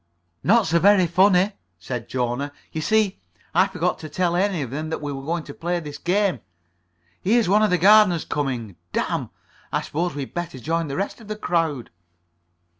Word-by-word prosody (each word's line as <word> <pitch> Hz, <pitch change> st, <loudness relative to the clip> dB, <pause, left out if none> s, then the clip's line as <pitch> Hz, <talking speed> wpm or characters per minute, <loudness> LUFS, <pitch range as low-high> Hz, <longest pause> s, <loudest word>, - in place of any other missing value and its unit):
"Not 225 Hz, +2 st, +4 dB
so 170 Hz, +1 st, +2 dB
very 195 Hz, 0 st, +5 dB
funny," 185 Hz, +3 st, +4 dB, 0.3 s
said 120 Hz, +6 st, -6 dB
Jona. 125 Hz, +3 st, -2 dB, 0.2 s
"You 155 Hz, -, -3 dB
see, 215 Hz, +2 st, +1 dB, 0.3 s
I 185 Hz, +4 st, +4 dB
forgot 180 Hz, -2 st, -1 dB
to 155 Hz, -, -8 dB
tell 175 Hz, +3 st, 0 dB
any 185 Hz, -4 st, +1 dB
of 125 Hz, -, -7 dB
them 155 Hz, +3 st, -4 dB
that 160 Hz, -, -3 dB
we 145 Hz, -1 st, -4 dB
were 135 Hz, -, -6 dB
going 165 Hz, +3 st, -2 dB
to 140 Hz, -, -9 dB
play 175 Hz, +3 st, -2 dB
this 150 Hz, -3 st, -8 dB
game. 185 Hz, -, +1 dB, 0.8 s
Here's 225 Hz, +2 st, +3 dB
one 205 Hz, +3 st, +4 dB
of 215 Hz, -, +3 dB
the 180 Hz, -, +3 dB
gardeners 195 Hz, -2 st, +5 dB
coming. 125 Hz, -9 st, -3 dB, 0.2 s
Damn. -, -, -1 dB, 0.4 s
I -, -, 0 dB
suppose 170 Hz, +1 st, -2 dB
we'd 140 Hz, -2 st, -5 dB
better 175 Hz, -6 st, -4 dB
join 165 Hz, +5 st, -1 dB
the 140 Hz, -, -4 dB
rest 200 Hz, +4 st, -3 dB
of 220 Hz, -, -13 dB
the 215 Hz, -, -4 dB
crowd." 165 Hz, -, -1 dB
170 Hz, 190 wpm, -23 LUFS, 145-195 Hz, 0.8 s, very